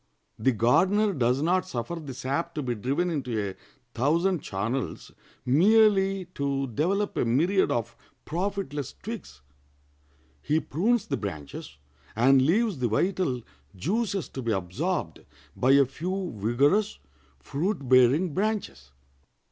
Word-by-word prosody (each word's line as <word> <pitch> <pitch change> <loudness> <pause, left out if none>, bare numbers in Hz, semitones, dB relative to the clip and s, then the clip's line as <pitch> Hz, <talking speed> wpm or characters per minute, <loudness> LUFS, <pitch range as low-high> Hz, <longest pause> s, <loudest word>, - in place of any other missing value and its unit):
The 130 +5 +3
gardener 190 - +3
does 130 -1 +1
not 185 +3 +1
suffer 125 0 -4
the 150 -6 -7
sap 140 +7 -3
to 150 - -2
be 125 -2 -1
driven 140 - -1
into 125 -8 -2
a - - -14 0.4
thousand 165 +6 +1
channels 115 +7 -4 0.3
merely 195 - +4
to 140 -1 -1
develop 180 - -1
a - - +2
myriad 165 +12 +2
of 115 -3 -2 0.3
profitless 175 -5 -3
twigs. 210 - -7 1.0
He 155 +2 +1
prunes 205 - 0
the 140 - -2
branches, 75 -8 -7 0.4
and 130 +4 +5
leaves 190 - +2
the 125 - +1
vital 130 - 0 0.3
juices 195 - -1
to 135 - -6
be 115 -2 -1
absorbed 90 -3 -2 0.3
by 130 +2 +3
a 140 0 +6
few 180 +6 -4
vigorous, 135 - +1 0.4
fruit 140 - -3
bearing 130 +7 +4
branches. 195 - -3
145 Hz, 125 wpm, -27 LUFS, 125-190 Hz, 1.0 s, a